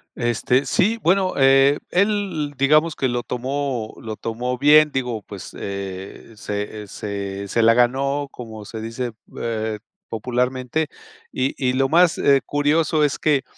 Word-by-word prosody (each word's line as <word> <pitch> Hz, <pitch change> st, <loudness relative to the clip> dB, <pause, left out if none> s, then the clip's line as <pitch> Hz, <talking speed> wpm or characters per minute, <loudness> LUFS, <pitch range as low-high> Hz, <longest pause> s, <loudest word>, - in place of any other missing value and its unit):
Este, 120 Hz, +3 st, +1 dB
sí, 225 Hz, +4 st, +1 dB
bueno, 185 Hz, +2 st, +2 dB
eh, 135 Hz, +1 st, +5 dB
él 195 Hz, -7 st, 0 dB
digamos, 150 Hz, +4 st, +3 dB
que 130 Hz, -, +1 dB
lo 120 Hz, -1 st, -2 dB
tomó 130 Hz, -2 st, -3 dB
lo 110 Hz, -2 st, -6 dB
tomó 125 Hz, +3 st, -3 dB
bien, 150 Hz, +3 st, +6 dB
digo, 125 Hz, -5 st, -2 dB
pues, -, -, -10 dB
eh, 100 Hz, +2 st, -7 dB
se, 105 Hz, 0 st, -5 dB
eh, -, -, -12 dB
se 100 Hz, -1 st, -5 dB
se 115 Hz, +4 st, +1 dB
la 115 Hz, 0 st, +6 dB
ganó, 135 Hz, +4 st, +1 dB
como 110 Hz, -5 st, -9 dB
se 110 Hz, +1 st, -7 dB
dice, 115 Hz, +1 st, -4 dB, 0.3 s
eh, 110 Hz, -2 st, -2 dB, 0.3 s
popularmente. 125 Hz, +5 st, -1 dB, 0.4 s
Y 130 Hz, +1 st, -1 dB
y, 125 Hz, -2 st, +1 dB
lo 135 Hz, +1 st, +2 dB
más, 170 Hz, +2 st, +4 dB
eh, 140 Hz, -1 st, +4 dB
curioso 150 Hz, +1 st, +2 dB
es 145 Hz, -, -2 dB
que, 145 Hz, -3 st, +2 dB
130 Hz, 150 wpm, -22 LUFS, 115-145 Hz, 0.4 s, bien